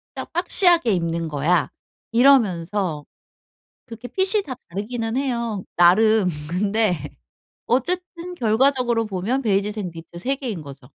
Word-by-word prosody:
딱 -, -, -7 dB
박시하게 350 Hz, -, +4 dB
입는 165 Hz, -1 st, -2 dB
거야.' 155 Hz, +3 st, +1 dB, 0.4 s
이러면서 200 Hz, -, +2 dB, 0.8 s
그렇게 235 Hz, 0 st, -9 dB
핏이 385 Hz, -, +2 dB
다 265 Hz, -, -6 dB, 0.2 s
다르기는 225 Hz, +5 st, -4 dB
해요 235 Hz, -7 st, -2 dB
나름. 195 Hz, +3 st, +4 dB, 0.2 s
근데 200 Hz, +2 st, +1 dB, 0.7 s
어쨌든 355 Hz, +6 st, -2 dB
결과적으로 240 Hz, -2 st, +1 dB
보면 210 Hz, +8 st, -2 dB
베이지색 205 Hz, -2 st, -1 dB
니트 165 Hz, +1 st, -11 dB
3 265 Hz, +9 st, -1 dB
개인 230 Hz, -, -5 dB
거죠. 140 Hz, -1 st, -11 dB
220 Hz, 270 characters per minute, -22 LUFS, 180-265 Hz, 0.8 s, 박시하게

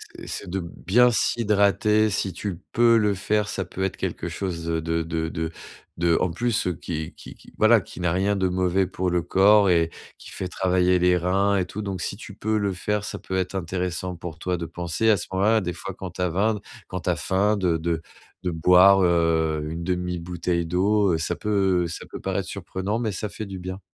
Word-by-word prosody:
c'est -, -, -10 dB
c'est -, -, -5 dB
de 95 Hz, -, -1 dB
bien 95 Hz, +8 st, +2 dB
s'hydrater. 105 Hz, -1 st, +2 dB
Si 95 Hz, -1 st, -1 dB
tu 90 Hz, 0 st, -5 dB
peux 115 Hz, 0 st, +5 dB
le 105 Hz, -2 st, +2 dB
faire, 105 Hz, +2 st, 0 dB
ça 95 Hz, -3 st, -3 dB
peut 95 Hz, +2 st, -5 dB
être 95 Hz, -, -2 dB
quelque -, -, -3 dB
chose 90 Hz, -4 st, -4 dB
de 85 Hz, -1 st, 0 dB
de 80 Hz, 0 st, -1 dB
de 80 Hz, 0 st, -2 dB
de 80 Hz, 0 st, -3 dB, 0.5 s
de 85 Hz, 0 st, +3 dB
en 90 Hz, -, +2 dB
plus, 115 Hz, +3 st, -1 dB
qui 80 Hz, -2 st, -4 dB
qui -, -, -11 dB
qui, -, -, -18 dB
voilà, 110 Hz, -1 st, +5 dB
qui 90 Hz, -, -10 dB
n'a 90 Hz, -2 st, +1 dB
rien 95 Hz, +3 st, +1 dB
de 95 Hz, -1 st, +1 dB
mauvais 95 Hz, +1 st, +1 dB
pour 90 Hz, 0 st, -2 dB
le 85 Hz, -1 st, 0 dB
corps 100 Hz, +2 st, +5 dB
et 85 Hz, -1 st, +3 dB, 0.3 s
qui -, -, -12 dB
fait 95 Hz, -, -5 dB
travailler 90 Hz, 0 st, +2 dB
les 90 Hz, 0 st, +4 dB
reins 95 Hz, +3 st, +2 dB
et 90 Hz, -, +1 dB
tout. 105 Hz, +4 st, -6 dB
Donc, 95 Hz, -3 st, -4 dB
si 100 Hz, -, -3 dB
tu 105 Hz, -4 st, -10 dB
peux 110 Hz, 0 st, 0 dB
le 100 Hz, -1 st, 0 dB
faire, 105 Hz, +3 st, -2 dB
ça -, -, -5 dB
peut 95 Hz, -, -5 dB
être 95 Hz, +1 st, -1 dB
intéressant 90 Hz, 0 st, -3 dB
pour 85 Hz, -2 st, -8 dB
toi 90 Hz, +1 st, -2 dB
de 85 Hz, -1 st, -5 dB
penser 85 Hz, +6 st, -1 dB
à 105 Hz, -, +5 dB
ce -, -, -5 dB
moment-là 105 Hz, +4 st, +3 dB
des 90 Hz, -1 st, -3 dB
fois, 90 Hz, +2 st, -7 dB
quand 95 Hz, -2 st, -6 dB
tu 90 Hz, -, -6 dB
as 90 Hz, -, +1 dB
faim 105 Hz, +4 st, +1 dB, 0.3 s
quand -, -, -4 dB
tu -, -, -2 dB
as -, -, +2 dB
faim, 100 Hz, +3 st, +1 dB
de 90 Hz, -4 st, +1 dB
de 80 Hz, 0 st, -2 dB, 0.4 s
de 90 Hz, -, -1 dB
boire, 90 Hz, +4 st, +6 dB
heu, 80 Hz, -3 st, +2 dB
une 85 Hz, +1 st, -5 dB
demi 90 Hz, -1 st, -2 dB
bouteille 85 Hz, 0 st, -2 dB
d'eau, 95 Hz, +3 st, +2 dB
heu, 80 Hz, -, +2 dB
ça 85 Hz, +2 st, -1 dB
peut 95 Hz, -4 st, +1 dB
ça 85 Hz, -, -7 dB
peut -, -, -6 dB
paraître -, -, -2 dB
surprenant, 95 Hz, +4 st, -3 dB
mais 110 Hz, -3 st, -1 dB
ça 105 Hz, +3 st, -4 dB
fait 110 Hz, -, -6 dB
du 95 Hz, -1 st, -7 dB
bien. 95 Hz, +2 st, -6 dB
90 Hz, 225 wpm, -24 LUFS, 85-100 Hz, 0.5 s, boire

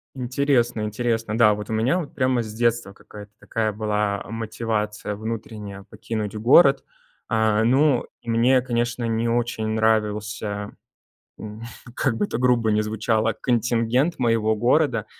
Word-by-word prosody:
Интересно, 125 Hz, -2 st, 0 dB
интересно. 115 Hz, 0 st, -2 dB
Да, 110 Hz, -3 st, +5 dB
вот 105 Hz, 0 st, -6 dB
у 110 Hz, -, -2 dB
меня 125 Hz, +11 st, +1 dB
вот 155 Hz, -, -7 dB
прямо 130 Hz, -2 st, +1 dB
с 110 Hz, -1 st, -8 dB
детства 115 Hz, -2 st, 0 dB
какая-то 105 Hz, +1 st, -13 dB
такая 110 Hz, -1 st, -2 dB
была 105 Hz, -1 st, -1 dB
мотивация 110 Hz, -2 st, -3 dB
внутренняя 105 Hz, -2 st, -6 dB
покинуть 110 Hz, -1 st, -5 dB
город. 135 Hz, +6 st, +5 dB, 0.5 s
Э, 110 Hz, -1 st, +2 dB
ну, 135 Hz, +2 st, +3 dB, 0.2 s
и 115 Hz, -, -9 dB
мне, 125 Hz, +3 st, +3 dB
конечно, 120 Hz, -1 st, -2 dB
не 115 Hz, +1 st, 0 dB
очень 120 Hz, -2 st, -1 dB
нравился, 105 Hz, -1 st, -1 dB, 0.7 s
м, 110 Hz, +1 st, -9 dB, 0.3 s
как 130 Hz, -4 st, 0 dB
бы -, -, -1 dB
это 160 Hz, -, -4 dB
грубо 120 Hz, -3 st, +2 dB
ни 105 Hz, -, +2 dB
звучало, 110 Hz, +1 st, 0 dB
контингент 120 Hz, +5 st, +1 dB
моего 115 Hz, -3 st, +1 dB
города. 120 Hz, -1 st, +2 dB
115 Hz, 140 wpm, -23 LUFS, 105-120 Hz, 0.7 s, Да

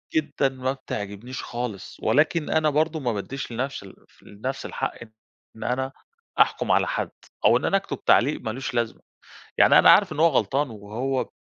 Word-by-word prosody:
جدًا 150 Hz, -3 st, +1 dB
ما 130 Hz, 0 st, -2 dB
بتعجبنيش 110 Hz, 0 st, -6 dB
خالص، 120 Hz, -6 st, -6 dB
ولكن 155 Hz, +2 st, +2 dB
أنا 155 Hz, -1 st, +2 dB
برضه 155 Hz, +2 st, +1 dB
ما 125 Hz, -5 st, -1 dB
بَادّيش 125 Hz, +6 st, -5 dB
لنَفْسي 130 Hz, -2 st, -4 dB
الف 95 Hz, -, -18 dB
لنفسي 130 Hz, +7 st, -5 dB
الحق 135 Hz, -, -3 dB, 0.6 s
إن 110 Hz, -, -8 dB
أنا 130 Hz, +2 st, -1 dB, 0.5 s
أحكُم -, -, +3 dB
على -, -, +3 dB
حَد، -, -, -2 dB, 0.3 s
أو -, -, +6 dB
إن -, -, -3 dB
أنا 195 Hz, -, +3 dB
أكتب 195 Hz, -, -6 dB
تعليق 140 Hz, +5 st, +4 dB
مالوش 125 Hz, +4 st, -4 dB
لازمة. 115 Hz, -2 st, -2 dB, 0.6 s
يعني -, -, +7 dB
أنا -, -, +8 dB
عارف -, -, +5 dB
إن 150 Hz, -, -4 dB
هو 165 Hz, -, +7 dB
غلطان، 135 Hz, +1 st, 0 dB
وهو 115 Hz, +5 st, -3 dB
130 Hz, 170 wpm, -24 LUFS, 115-145 Hz, 0.6 s, أنا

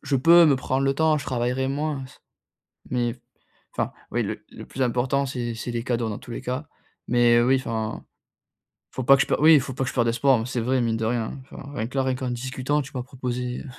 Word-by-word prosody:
je 140 Hz, -1 st, 0 dB
peux 170 Hz, +6 st, +7 dB
me 140 Hz, -4 st, +4 dB
prendre 130 Hz, +1 st, -1 dB
le 135 Hz, 0 st, +2 dB
temps, 160 Hz, +1 st, +3 dB
je -, -, -7 dB
travaillerai 125 Hz, +1 st, -1 dB
moins, 145 Hz, -1 st, -2 dB
c -, -, -18 dB, 0.7 s
mais 120 Hz, -2 st, 0 dB
f 125 Hz, -, -23 dB, 0.6 s
enfin, -, -, 0 dB, 0.2 s
oui, -, -, 0 dB
le -, -, -5 dB
le -, -, -10 dB
plus 135 Hz, -, -6 dB
important, 130 Hz, +3 st, +1 dB
c'est 125 Hz, -3 st, -3 dB
c'est 120 Hz, +2 st, -5 dB
les 115 Hz, -1 st, -3 dB
cadeaux 120 Hz, -2 st, -1 dB
dans 105 Hz, -, -4 dB
tous 120 Hz, -, -11 dB
les -, -, -5 dB
cas. 130 Hz, +4 st, -4 dB, 0.4 s
Mais, 120 Hz, -1 st, +4 dB
heu, 120 Hz, -, +4 dB
oui, 135 Hz, +1 st, +4 dB
enfin, 110 Hz, -4 st, -4 dB, 0.9 s
faut 130 Hz, -, -4 dB
pas 135 Hz, +3 st, +7 dB
que 135 Hz, -, +3 dB
je -, -, -1 dB
pe -, -, +1 dB
oui 160 Hz, +2 st, +8 dB
il 145 Hz, -, +6 dB
faut 130 Hz, -1 st, -6 dB
pas 135 Hz, -, -1 dB
que 125 Hz, -, -2 dB
je -, -, -11 dB
perde 120 Hz, -2 st, +2 dB
espoir, 125 Hz, +2 st, +3 dB
mais 110 Hz, -, -3 dB
c'est 125 Hz, -2 st, -2 dB
vrai, 130 Hz, +2 st, +1 dB
mine 115 Hz, -1 st, 0 dB
de 110 Hz, -, -2 dB
rien, 115 Hz, 0 st, 0 dB
hein. 135 Hz, -, -7 dB
Enfin, 140 Hz, +1 st, -10 dB
rien 110 Hz, -, -2 dB
que 135 Hz, -, -8 dB
là 135 Hz, -, +2 dB
rien 130 Hz, -1 st, 0 dB
qu'en 125 Hz, -1 st, -3 dB
discutant 130 Hz, +4 st, -1 dB
tu 135 Hz, -, -12 dB
m'as 125 Hz, -, -2 dB
proposé 125 Hz, 0 st, -4 dB
130 Hz, 260 wpm, -24 LUFS, 120-135 Hz, 0.9 s, oui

